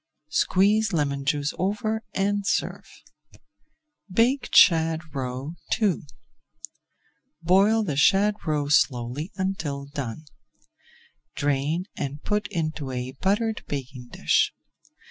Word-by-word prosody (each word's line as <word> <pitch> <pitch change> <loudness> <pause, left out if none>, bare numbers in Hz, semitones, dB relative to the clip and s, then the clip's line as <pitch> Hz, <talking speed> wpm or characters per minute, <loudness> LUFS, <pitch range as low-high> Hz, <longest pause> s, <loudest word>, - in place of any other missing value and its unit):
Squeeze 205 +7 +2
lemon 140 -3 -1
juice 145 0 0
over 215 +3 -1
and 200 +1 0
serve. - - -2 1.2
BAKED 240 +8 +1
SHAD 160 -2 +5
ROE 130 +3 -4 0.3
II 195 -8 0 1.4
Boil 200 +6 +4
the 155 -9 -2
shad 195 +9 +4
roe 150 -2 0
slowly 140 - +1
until 160 -8 -3
done. 140 0 -6 1.1
Drain 145 +5 0
and 140 +1 -4
put 210 0 -1
into 155 -6 -3
a 125 0 -4
buttered 205 - -1
baking 130 -3 -6
dish. - - +1
155 Hz, 100 wpm, -25 LUFS, 140-200 Hz, 1.4 s, SHAD